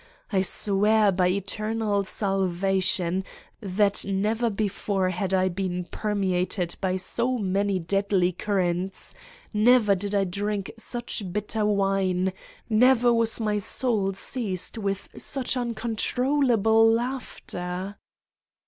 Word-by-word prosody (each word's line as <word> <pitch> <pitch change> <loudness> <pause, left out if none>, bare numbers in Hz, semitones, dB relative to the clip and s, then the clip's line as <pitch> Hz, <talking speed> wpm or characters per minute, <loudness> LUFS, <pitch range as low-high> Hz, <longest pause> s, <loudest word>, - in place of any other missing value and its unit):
I 190 - +3
swear 205 +2 +3
by 180 -1 +2
eternal 205 +2 -1
salvation 190 -2 0 0.4
that 200 0 +1
never 215 +4 0
before 200 -2 -1
had 185 +1 -2
I 185 -1 +3
been 180 -1 -3
permeated 185 -3 -1
by 185 -1 0
so 240 +7 -1
many 200 -1 0
deadly 190 0 +1
currents, 185 -1 -2 0.4
never 215 -1 +5
did 200 +2 -2
I 200 - +3
drink 200 +1 -2
such 230 -4 -4
bitter 210 +2 -1
wine, 195 -2 +1 0.3
never 240 +1 +4
was 230 0 +1
my 210 -2 0
soul 205 -2 -1
seized 200 -3 -3
with 195 -2 -2
such 265 -3 -2
uncon 235 -2 -3
trollable 230 -3 +3
laughter! 200 -6 -4
200 Hz, 110 wpm, -25 LUFS, 190-220 Hz, 0.4 s, never